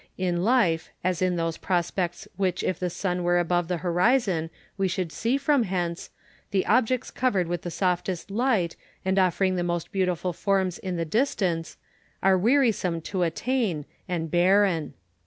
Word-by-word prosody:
In 175 -2 0
life, 195 -8 +2
as 185 -1 0
in 185 -1 +2
those 165 -1 -1
prospects 175 -1 -1
which 185 -1 -1
if 185 - -1
the 180 - -1
sun 180 0 -2
were 175 0 +2
above 175 0 +1
the 180 - -1
horizon 180 -2 +2 0.3
wo 195 -1 +1
should 180 -3 -2
see 235 +10 0
from 285 -1 +2
hence, 180 -4 -2 0.4
the 195 -2 +1
objects 250 +2 +2
covered 200 -9 +1
with 175 0 -2
the 175 - -5
softest 180 +1 -1
light, 210 -6 +1 0.3
and 190 +1 +2
offering 185 0 +2
the 175 - 0
most 175 -1 -2
beauti 185 -3 +1
ful 180 +2 -3
forms 190 -1 0
in 185 -2 -4
the 165 -1 -1
distance, 180 - 0 0.5
are 195 0 +5
wearisome 215 -5 +2
to 185 +3 -3
attain 180 - 0 0.2
and 165 -3 -2
barren. 180 -3 +3
180 Hz, 165 wpm, -26 LUFS, 175-200 Hz, 0.5 s, are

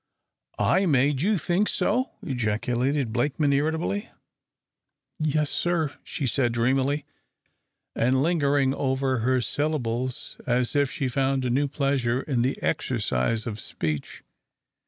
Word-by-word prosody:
"I 190 0 +3
made 140 -2 +3
you 205 +4 +2
think 180 +4 +1
so!" 255 +5 0
ejaculated 125 +2 -1
Blakeman, 140 +3 +1
irritably. 160 +9 0 1.1
"Yes, 155 -1 +1
sir," 165 -5 0
she 140 - -4
said, 120 -1 +1
dreamily, 135 +4 +1 0.9
and 130 +3 +2
lingering 145 -5 +2
over 130 -2 0
her 130 +3 +2
syllables 130 -1 -2
as 125 +1 +1
if 145 -2 +3
she 140 -2 -2
found 135 0 0
a 125 - 0
new 140 +4 +2
pleasure 135 -3 0
in 130 -5 0
the 130 +3 0
exercise 110 - 0
of 110 -2 -4
speech. 75 -8 -4
135 Hz, 120 wpm, -26 LUFS, 125-150 Hz, 1.1 s, I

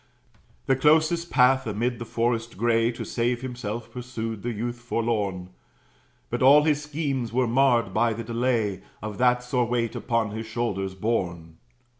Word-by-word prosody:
The 135 - +3
closest 160 +4 +3
path, 130 0 +4
amid 115 +3 -1
the 120 - -5
forest 115 -1 -1
gray, 115 +1 +2
To - - -6
save 120 +1 -1
himself, 120 -3 -5
pursued 115 -4 -5
the 120 - -2
youth 120 +2 -4
forlorn; 105 -6 -2 0.8
But - - -2
all 140 +3 +7
his 150 -1 +2
schemes 145 -6 -3
were 125 +2 +2
marred 120 -4 +3
by 115 +2 +2
the 115 +2 -5
delay 115 -4 0 0.2
Of 105 -2 -6
that 125 0 +3
sore 125 0 0
weight 115 -1 -1
upon 115 -3 -1
his 110 +1 -5
shoulders 100 -5 -2
borne. 85 -6 -2
120 Hz, 155 wpm, -25 LUFS, 110-125 Hz, 0.8 s, all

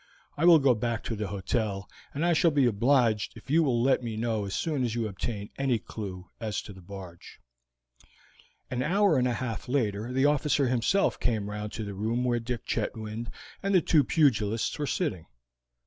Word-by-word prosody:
I 155 - +1
will 175 -2 +9
go 135 -4 +4
back 115 0 -2
to 115 - -3
the 105 -1 -3
hotel, 100 0 -2 0.2
and 150 +4 -1
I 175 - +4
shall 165 +2 +4
be 145 -4 +3
obliged 115 -3 +2
if - - -9
you 165 +2 +5
will 125 -6 +2
let 130 0 +3
me 115 -3 -4
know 110 -2 -1
as 100 - -4
soon 150 -5 -1
as 120 -2 -1
you 115 -2 -1
obtain 105 +1 -5
any 135 -3 +2
clew 95 -4 -7
as 110 -4 -2
to 105 - -10
the 95 - -13
barge." 90 -2 -11 1.3
An 125 0 -1
hour 180 +1 +3
and 125 - +2
a 125 - 0
half 115 -4 -4
later 115 -4 0
the 130 +2 +2
officer 145 -1 +2
himself 125 - +1
came 105 -4 -1
round 105 0 -5
to 110 - -4
the 100 -1 -5
room 110 +5 -1
where 120 -1 +1
Dick 120 -1 -5
Chetwynd 110 +1 -3 0.3
and 195 0 +1
the - - +8
two 155 -2 +4
pugilists 115 -8 +1
were 145 - -1
sitting. 95 - -2
120 Hz, 195 wpm, -28 LUFS, 105-135 Hz, 1.3 s, will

